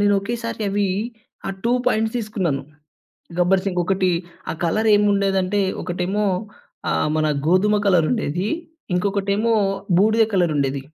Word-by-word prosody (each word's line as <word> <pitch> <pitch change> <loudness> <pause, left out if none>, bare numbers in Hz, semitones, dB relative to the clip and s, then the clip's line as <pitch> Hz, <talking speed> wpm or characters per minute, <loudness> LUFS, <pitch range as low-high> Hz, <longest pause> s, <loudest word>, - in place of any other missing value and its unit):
నేనొకేసారి 215 +3 0
అవి 200 0 +1 0.6
ఆహ్, 195 - -4
2 235 - +2
ప్యాంట్స్ 220 +1 +1
తీసుకున్నాను. 190 -10 -2 0.8
'గబ్బర్‌సింగ్' 185 0 +2
ఒకటి 185 -1 +1 0.4
ఆ - - -5
కలర్ 215 +6 +1
ఏముండేదంటే, 200 -1 +2 0.2
ఒకటేమో 185 +4 -1 0.7
ఆహ్, - - +1
మన 155 - +2 0.2
గోధుమ 205 +4 +4
కలరుండేది. 180 0 +1 0.5
ఇంకొకటేమో 200 +4 +1 0.5
బూడిద 220 +2 +4
కలరుండేది. 145 -6 +1
195 Hz, 105 wpm, -21 LUFS, 180-210 Hz, 0.8 s, గోధుమ